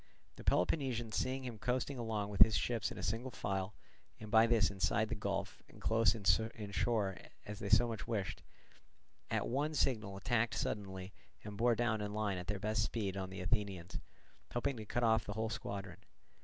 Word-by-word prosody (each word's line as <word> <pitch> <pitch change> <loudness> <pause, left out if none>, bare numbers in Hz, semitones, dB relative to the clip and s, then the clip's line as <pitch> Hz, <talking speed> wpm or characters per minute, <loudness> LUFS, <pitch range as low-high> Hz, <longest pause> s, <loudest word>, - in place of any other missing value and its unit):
The - - -10
Peloponnesians 120 - +1
seeing 130 +1 0
him 120 -4 -6
coasting 125 +4 -1
along 110 -3 -2
with 100 - -1
his 110 -1 +9
ships 75 - 0
in - - -7
single 115 +5 -1
file, 95 -3 -3 0.4
and 110 -1 -8
by 115 0 +7
this 110 -5 +4
inside 80 -11 +1
the - - -1
gulf - - -3
and - - -15
close 115 +1 +3
inshore 105 0 +1 0.3
as 105 0 -6
they 100 - -3
so 120 - +6
much 115 -1 -5
wished, 105 -5 -2 0.9
at - - 0
one 145 +5 0
signal 105 -9 0
tacked 115 +2 +1
suddenly 95 -2 -3 0.3
and 105 -1 -7
bore 120 +3 +3
down 110 -2 +1
in 105 0 -3
line 105 -4 0
at 90 - -7
their 105 +1 -1
best 110 +2 0
speed 105 -3 -1
on 95 -1 -3
the 95 0 -6
Athenians, 95 -2 -1 0.6
hoping 135 +3 +1
to 110 - -6
cut 120 - 0
off 110 -2 +4
the - - -4
whole 110 0 -1
squadron. 100 -5 -5
110 Hz, 185 wpm, -36 LUFS, 100-115 Hz, 0.9 s, his